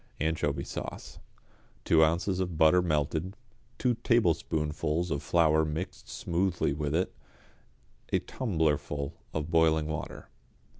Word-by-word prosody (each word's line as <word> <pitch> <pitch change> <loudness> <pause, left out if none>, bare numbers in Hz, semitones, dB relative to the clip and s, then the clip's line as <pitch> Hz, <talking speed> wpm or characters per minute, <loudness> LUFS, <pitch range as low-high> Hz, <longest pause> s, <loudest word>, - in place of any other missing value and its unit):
=Anchovy 75 -3 0
Sauce.= - - -7 0.7
Two 80 -1 +5
ounces 85 +4 +1
of 90 -3 -2
butter 80 +3 +5
melted, 80 +3 -1 0.4
two 125 -1 +2
tablespoonfuls 80 -5 +1
of 70 -2 -1
flour 80 +1 +3
mixed 80 +4 -5
smoothly 85 -4 0
with 75 +1 -2
it, 90 +3 0 1.0
a - - +4
tumblerful 75 - -1 0.2
of 80 +1 -3
boiling 80 -1 +4
water. 80 0 -6
80 Hz, 110 wpm, -29 LUFS, 75-85 Hz, 1.0 s, Two